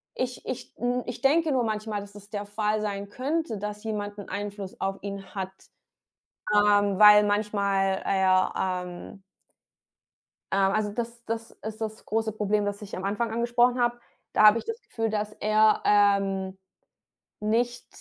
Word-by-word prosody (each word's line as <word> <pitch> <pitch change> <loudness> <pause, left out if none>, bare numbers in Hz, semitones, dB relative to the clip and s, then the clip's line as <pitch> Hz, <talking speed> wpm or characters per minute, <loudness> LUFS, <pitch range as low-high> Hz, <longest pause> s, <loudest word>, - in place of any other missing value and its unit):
ich 250 -1 -4
ich 255 - -6
n 245 +1 -1
ich 240 -1 -6
denke 310 +4 +3
nur 255 -3 +2
manchmal, 215 -1 -2
dass 200 0 -12
das 205 0 -13
der 205 -1 -4
Fall 210 +1 -1
sein 200 -1 -4
könnte, 275 +2 -2
dass 210 +1 -5
jemand 205 -2 -4
'n 200 - -9
Einfluss 200 -1 -6
auf 195 0 -1
ihn 200 -1 -7
hat, 190 -1 -3 1.0
ähm, 205 -1 +4
weil 210 0 +9
manchmal 200 -2 +1
er, 190 -1 +3
ähm 180 +1 -4 1.3
ähm, 195 0 +3
also, 210 0 0
das 235 +1 -5
das 225 0 -4
ist 220 0 -7
das 220 0 -5
große 220 +1 -1
Problem, 210 0 0
das 205 0 -3
ich 205 -1 -7
am 185 - -6
Anfang 210 +4 -1
angesprochen 240 +2 +2
habe. 240 0 +1 0.3
Da - - +4
habe 215 +2 +8
ich - - -10
das 455 +1 -5
Gefühl, 225 -1 -3
dass 210 0 -2
er, 215 0 +4
ähm, 195 -2 +2 0.8
nicht, 235 +3 0
210 Hz, 160 wpm, -27 LUFS, 200-225 Hz, 1.3 s, weil